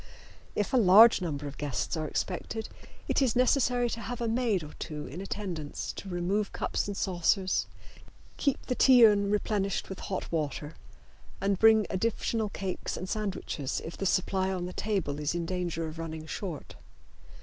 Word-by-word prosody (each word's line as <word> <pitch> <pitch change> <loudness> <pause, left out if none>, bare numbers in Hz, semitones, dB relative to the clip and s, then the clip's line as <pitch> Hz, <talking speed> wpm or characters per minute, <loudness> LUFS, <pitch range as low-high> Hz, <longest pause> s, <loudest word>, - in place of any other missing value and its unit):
If 210 +6 -1
a - - +5
large 220 +1 +8
number 145 -5 -3
of 145 0 -7
guests 145 +2 -2
are 155 -1 -2
expected 215 +7 -3 0.4
it - - +1
is 255 -5 +2
necessary 250 -1 +3
to 230 - -4
have 245 +3 -5
a 235 - -1
maid 225 -6 +1
or 150 - -10
two 150 -2 -5
in 165 +8 -7
attendance 185 -7 -4
to 195 - -8
remove 190 +4 -1
cups - - -1
and 200 -1 -4
saucers, 185 +1 +1 0.7
keep 280 -3 -1
the 255 - -1
tea 250 -2 +7
urn 200 -2 +4
replenished 205 -1 -1
with 190 - -6
hot 190 - -4
water 150 -1 -2 0.7
and 195 0 +1
to - - -23
bring 220 -1 +6
additional 220 +2 0
cakes 190 -2 -4
and 185 - -5
sandwiches 190 -9 -3
if 165 - -6
the 195 - -1
supply 190 +1 +1
on 180 -2 -2
the 180 - -6
table 185 -9 -1
is 150 +3 -1
in 170 -1 -2
danger 175 -2 -2
of 160 +1 -8
running 160 -1 -5
short. 165 -1 -6
190 Hz, 175 wpm, -29 LUFS, 165-215 Hz, 0.7 s, large